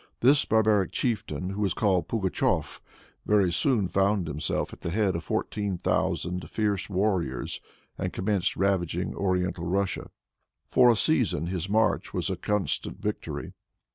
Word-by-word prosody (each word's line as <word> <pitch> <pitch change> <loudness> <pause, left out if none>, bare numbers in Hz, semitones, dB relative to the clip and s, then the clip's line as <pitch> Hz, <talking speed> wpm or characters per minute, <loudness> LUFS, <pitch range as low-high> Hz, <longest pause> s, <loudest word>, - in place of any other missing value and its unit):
This 140 +4 +5
barbaric 110 -3 +3
chieftain, 95 - -2
who 100 +2 -4
was 95 -3 +1
called 95 -6 +1
Pugatshef, 95 -4 0 0.5
very 100 -4 +4
soon 105 +1 +1
found 95 0 +1
himself 75 +1 -2
at - - -12
the - - -3
head 100 0 +1
of 85 - -3
fourteen 100 -3 -2
thousand 90 +1 -1
fierce 105 -3 -1
warriors, 90 - -1 0.4
and - - -2
commenced 95 -1 0
ravaging 90 -2 0
oriental 90 -3 -1
Russia. 95 +2 -1 0.6
For 125 -1 +5
a 120 - +5
season 115 - +1
his 90 +1 -3
march 110 0 +1
was - - -1
a - - -1
constant 105 -2 -2
victory. - - -4
95 Hz, 140 wpm, -27 LUFS, 90-105 Hz, 0.6 s, This